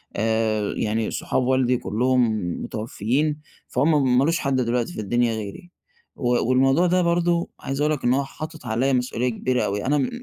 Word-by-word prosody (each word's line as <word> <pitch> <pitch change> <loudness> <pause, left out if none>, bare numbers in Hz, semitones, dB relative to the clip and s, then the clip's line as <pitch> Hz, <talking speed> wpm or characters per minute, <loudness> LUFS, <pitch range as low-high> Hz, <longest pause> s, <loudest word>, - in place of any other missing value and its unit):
آآ، 110 -1 0
يعني 110 0 -1
صحاب 130 - -1
والدي 125 -1 +2
كلُّهم 120 0 +1 0.3
متوفيين، 120 +7 -2 0.3
فهم 135 -2 +2
مالوش 165 +6 +2
حد 140 -2 0
دلوقتي 125 +5 0
في - - -7
الدنيا 120 +2 +1
غيري، 110 - -7 0.4
و 120 -1 0
والموضوع 135 +7 +4
ده 180 +1 +2
برضه 170 0 +1
عايز 135 +2 -4
أقول 150 - +2
لك 145 - -5
إن 120 - +3
هو 140 +1 +1
حاطط 155 0 -9
عليَّا 125 +4 +1
مسؤوليّة 125 0 0
كبيرة 125 +2 -1
أوي، 100 +1 -2
أنا 140 -1 +1
125 Hz, 165 wpm, -23 LUFS, 115-145 Hz, 0.4 s, والموضوع